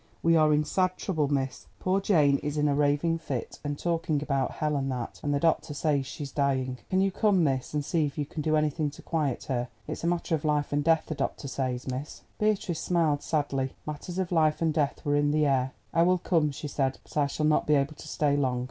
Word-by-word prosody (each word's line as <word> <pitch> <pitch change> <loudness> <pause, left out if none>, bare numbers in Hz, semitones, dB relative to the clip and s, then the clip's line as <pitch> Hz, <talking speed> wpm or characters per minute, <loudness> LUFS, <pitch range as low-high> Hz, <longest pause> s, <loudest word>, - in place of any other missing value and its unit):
We 165 0 +5
are 155 -1 +5
in 150 0 +3
sad 185 +4 0
trouble, 160 -7 0
miss. 135 -2 -2
Poor 190 +1 +1
Jane 150 -8 +4
is 150 0 -3
in 150 0 +2
a 145 - +2
raving 145 +3 +2
fit, 135 -7 -5
and 145 -1 -3
talking 165 -2 0
about 135 -3 0
hell 150 -1 -1
and 135 -1 -1
that, 125 -2 -5
and 145 - -1
the 140 - +1
doctor 160 -1 +1
says 145 -3 0
she's 140 0 -6
dying. 130 -3 0
Can 190 0 +2
you 195 0 +2
come, 195 -2 +3
miss, 135 -4 0
and 145 -1 -1
see 160 -2 +1
if 140 - -9
you 145 - -1
can 150 +2 -5
do 155 +1 +1
anything 150 0 +1
to 145 - -13
quiet 150 -6 -1
her? 125 -2 -2 0.2
It's - - -5
a - - +1
matter 170 -1 0
of 155 -1 0
life 150 -2 0
and 145 0 +1
death, 160 0 +3
the - - -4
doctor 145 - -3
says, 130 -1 -3
miss." 130 +3 -5 0.2
Beatrice 210 -6 0
smiled 160 -5 +1
sadly; 140 -4 -1
matters 155 +4 -6
of 185 -2 -1
life 155 -3 +3
and 160 -2 +1
death 145 -2 -1
were 145 0 +2
in 145 0 +3
the 150 +1 +2
air. 130 -2 +2 0.2
"I 165 - +3
will 180 +2 +4
come," 165 -3 +1
she 145 +1 -6
said, 135 -2 -1
"but - - -17
I 145 -2 +3
shall 150 +2 -2
not 155 0 +2
be 150 - +5
able 140 +2 +1
to - - -12
stay 145 -2 +1
long." 130 -3 +1
150 Hz, 245 wpm, -28 LUFS, 140-165 Hz, 0.2 s, We